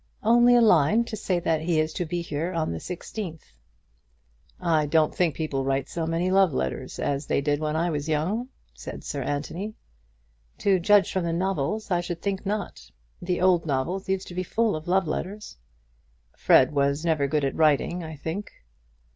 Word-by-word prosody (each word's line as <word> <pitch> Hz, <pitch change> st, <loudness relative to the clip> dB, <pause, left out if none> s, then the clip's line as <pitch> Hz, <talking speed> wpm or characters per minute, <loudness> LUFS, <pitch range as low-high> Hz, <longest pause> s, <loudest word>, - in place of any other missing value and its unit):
"Only 240 Hz, +2 st, +5 dB
a 240 Hz, -, +6 dB
line 210 Hz, +1 st, +4 dB
to 230 Hz, -1 st, -6 dB
say 190 Hz, -4 st, -1 dB
that 160 Hz, -2 st, 0 dB
he 165 Hz, -1 st, +1 dB
is 155 Hz, 0 st, 0 dB
to 175 Hz, -, -2 dB
be 175 Hz, +1 st, -2 dB
here 165 Hz, +3 st, -3 dB
on 165 Hz, -, -1 dB
the 80 Hz, -, -4 dB
sixteenth." 175 Hz, -, -7 dB, 1.1 s
"I 155 Hz, -3 st, +1 dB
don't 155 Hz, 0 st, +2 dB
think 175 Hz, -4 st, +1 dB
people 145 Hz, -4 st, -2 dB
write 135 Hz, 0 st, -1 dB
so 165 Hz, -2 st, -3 dB
many 170 Hz, +3 st, 0 dB
love 190 Hz, -5 st, +4 dB
letters 65 Hz, -, -3 dB
as 140 Hz, 0 st, -2 dB
they -, -, +1 dB
did 145 Hz, +1 st, 0 dB
when 155 Hz, 0 st, -2 dB
I 170 Hz, +2 st, +1 dB
was 150 Hz, 0 st, -3 dB
young," 190 Hz, -, -1 dB, 0.2 s
said -, -, -8 dB
Sir 140 Hz, -, -4 dB
Anthony. 160 Hz, -, -4 dB, 0.8 s
"To 195 Hz, -2 st, +2 dB
judge 205 Hz, +3 st, +4 dB
from 185 Hz, -, 0 dB
the 170 Hz, -1 st, -1 dB
novels, 190 Hz, +3 st, -1 dB
I 175 Hz, -1 st, +2 dB
should 175 Hz, -1 st, -5 dB
think 195 Hz, 0 st, -2 dB
not. 210 Hz, 0 st, -4 dB, 0.3 s
The 175 Hz, 0 st, -1 dB
old 180 Hz, -3 st, +3 dB
novels 170 Hz, +8 st, -2 dB
used 190 Hz, 0 st, -1 dB
to -, -, -8 dB
be 180 Hz, -, -2 dB
full 220 Hz, +3 st, 0 dB
of 155 Hz, +1 st, -7 dB
love 190 Hz, -1 st, +2 dB
letters." 195 Hz, -, -5 dB, 0.8 s
"Fred 130 Hz, -, +5 dB
was 140 Hz, +2 st, 0 dB
never 155 Hz, -4 st, +2 dB
good 145 Hz, 0 st, 0 dB
at 135 Hz, -, -1 dB
writing, 160 Hz, +3 st, +2 dB
I 160 Hz, -1 st, -7 dB
think." 160 Hz, +8 st, -5 dB
170 Hz, 190 wpm, -25 LUFS, 150-190 Hz, 1.1 s, a